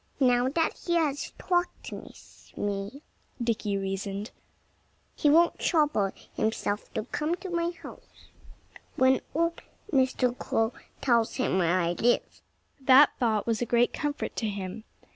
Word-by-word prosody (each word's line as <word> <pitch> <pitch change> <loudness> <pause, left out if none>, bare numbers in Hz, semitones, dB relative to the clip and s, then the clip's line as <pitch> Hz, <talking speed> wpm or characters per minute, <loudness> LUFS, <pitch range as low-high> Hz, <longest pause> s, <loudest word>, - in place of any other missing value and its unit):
"Now 250 -1 +3
that 325 +3 +1
he 345 - +2
has 300 -4 0
talked 355 -1 -1
with - - -12
me," 205 +7 -3 0.4
Dickie 225 -4 -1
reasoned, 195 +2 -4 0.8
"he 295 - +2
won't 335 +3 +4
trouble 295 - +2 0.2
himself 215 -1 -2
to - - -1
come 300 +7 -2
to 370 +1 -8
my 340 0 0
house 345 - -13 0.7
when 260 0 +4
old 335 +1 0 0.3
Mr. 260 -2 +2
Crow 225 -1 0 0.3
tells 235 -4 +2
him 255 -7 +1
where 175 +1 +2
I 170 -1 +1
live." 240 +7 0 0.4
That 270 +2 +7
thought 220 -4 +1
was 230 -1 0
a 240 - -1
great 240 +1 +3
comfort 295 -1 -3
to 220 - -1
him. 200 +2 -6
245 Hz, 140 wpm, -28 LUFS, 210-295 Hz, 0.8 s, That